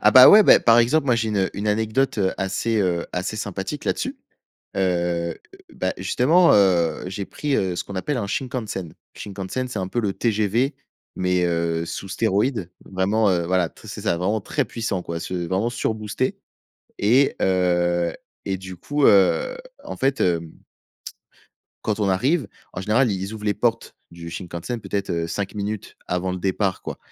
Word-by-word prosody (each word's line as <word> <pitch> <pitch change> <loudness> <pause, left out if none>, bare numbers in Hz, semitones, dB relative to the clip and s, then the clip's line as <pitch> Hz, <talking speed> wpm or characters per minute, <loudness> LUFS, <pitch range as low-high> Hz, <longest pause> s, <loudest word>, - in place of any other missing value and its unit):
Ah, - - +5
bah, 130 0 +10
ouais, 215 +1 +9
beh, - - +7
par 115 0 +5
exemple, 140 +6 +3
moi, 125 - +4
j'ai 115 -1 0
une 100 -3 0
une 100 +1 -3
anecdote, 110 +4 +1
heu, 95 -2 +2
assez, 100 +3 0
heu, 90 -3 0
assez 90 +4 -3
sympathique 100 +6 -4
là-dessus. - - -2 0.6
Heu, 85 -3 0 0.4
bah, 95 - -2
justement, 145 - +4
heu, 90 -6 +3
j'ai 100 +1 -4
pris, 145 +5 -2
heu, 95 -2 0
ce - - -3
qu'on 100 - -9
appelle 130 +9 -2
un 100 - -2
Shinkansen. 110 -8 -4 0.2
Shinkansen, 100 +5 -4
c'est 115 -5 -4
un 95 - -2
peu 120 - -2
le 105 -4 -1
TGV 115 +5 0 0.4
mais 90 -1 +1
heu, 85 -1 0
sous 95 +3 -6
stéroïdes, 105 -1 0
vraiment, 100 +3 +1
heu, 85 -2 +1
voilà 90 -1 +1
t - - -16
c'est - - -7
ça, 85 - 0
vraiment 100 +5 0
très 140 +8 -1
puissant, 110 -4 -3
quoi, 85 -1 -5
c'est 90 -1 -3
vraiment 95 +6 0
surboosté 110 +1 -2 0.6
et 125 +7 +4
heu, 85 -2 +2 0.3
et 95 - -1
du 95 -1 -9
coup, 145 - -1
heu, 100 - +4 0.3
en - - -7
fait, 135 +1 0
hem 85 -2 0 1.3
quand 110 0 -1
on 100 - +2
arrive, 130 - +1 0.2
en - - -5
général, 110 +4 +2
i - - -1
ils 95 +3 -4
ouvrent 105 -1 -8
les 105 - +2
portes 115 -1 -1 0.2
du 85 0 -9
Shinkansen, 85 +7 -5
peut-être, 100 -2 -3
heu, 85 -1 -1
5 95 +4 -3
minutes 105 0 -5
avant 90 +1 -1
le 90 - -4
départ, 95 +1 -1
quoi - - -6
100 Hz, 180 wpm, -23 LUFS, 90-115 Hz, 1.3 s, bah